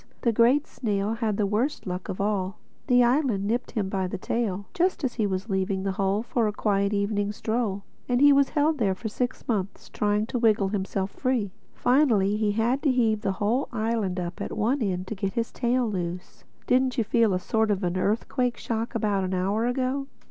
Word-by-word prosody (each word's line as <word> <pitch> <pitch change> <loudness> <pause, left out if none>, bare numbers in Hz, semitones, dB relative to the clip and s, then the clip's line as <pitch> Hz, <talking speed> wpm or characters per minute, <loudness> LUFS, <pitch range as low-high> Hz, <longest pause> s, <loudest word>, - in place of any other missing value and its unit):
The 235 - +2
Great 245 +6 +4
Snail 205 -2 -2
had 225 -3 -1
the 210 - +2
worst 225 +9 -1
luck 180 -1 -5
of 185 - -4
all: 200 -1 -1 0.3
the 245 -2 +5
island 240 -5 +2
nipped 235 +4 -1
him 210 -5 -2
by 190 -1 -1
the - - -4
tail 200 -1 -2
just 360 -2 0
as 255 -3 0
he 215 -4 0
was 190 +1 -3
leaving 190 -1 -1
the 195 - 0
Hole 195 +2 0
for 235 -2 0
a - - 0
quiet 200 -1 0
evening 205 0 0
stroll. 215 -2 -2 0.3
And 245 0 +2
he 285 +1 +7
was 275 -1 +4
held 300 0 +1
there 195 -4 +1
for 220 +4 -5
six 245 +3 -3
months 200 -4 -2
trying 210 0 0
to 245 - -3
wriggle 215 -4 +3
himself 195 -1 -2
free. 250 -7 -1 0.2
Finally 235 -7 +3
he 210 -1 +1
had 235 +5 +1
to 285 - +3
heave 225 -4 +2
the 195 - 0
whole 215 +8 0
island 220 -5 -1
up 175 -1 -5
at - - -4
one 240 +6 +1
end 185 -4 -1
to 195 - -5
get 195 -2 -3
his 230 -1 -2
tail 245 0 +1
loose. 180 -3 -5 0.2
Didn't 255 +1 +2
you 230 - +3
feel 225 0 +2
a - - 0
sort 220 +3 0
of 200 -1 0
an 175 0 0
earthquake 235 +6 0
shock 230 +1 -3
about 205 -3 +1
an 185 0 -1
hour 200 +5 0
ago?" 260 +2 -1
215 Hz, 210 wpm, -26 LUFS, 195-245 Hz, 0.3 s, he